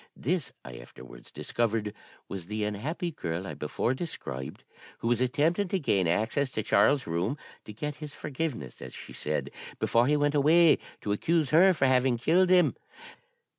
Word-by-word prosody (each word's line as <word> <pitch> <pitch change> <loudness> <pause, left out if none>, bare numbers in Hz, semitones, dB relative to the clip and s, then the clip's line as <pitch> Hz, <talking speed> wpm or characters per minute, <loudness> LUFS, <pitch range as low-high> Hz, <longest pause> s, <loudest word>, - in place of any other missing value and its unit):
This, 165 +2 -1
I 60 -2 -9
afterwards 60 +1 -13
discovered, 110 -3 -2 0.3
was 95 -4 -7
the 105 +1 -3
unhappy 140 - -3
girl 85 - -4
I - - -5
before 120 - -1
described, 70 - -6 0.3
who - - -4
was 120 0 +2
attempting 160 +10 +1
to 190 +1 -1
gain 100 - +1
access 110 +10 +1
to 110 - -1
Charles's 125 +8 +3
room, 90 - -1 0.3
to - - -8
'get 150 +6 -5
his 150 -2 -8
forgiveness,' 135 - -5
as - - -9
she - - -10
said, - - -3 0.3
'before 120 +2 +2
he 150 +1 +3
went 145 0 +1
away 155 +3 +5 0.2
to 105 - -3
accuse 155 +7 +1
her 180 +5 +7
for 135 - +2
having 130 -1 +3
killed 180 +9 +3
him.' 180 -1 +5
130 Hz, 170 wpm, -28 LUFS, 105-155 Hz, 0.3 s, her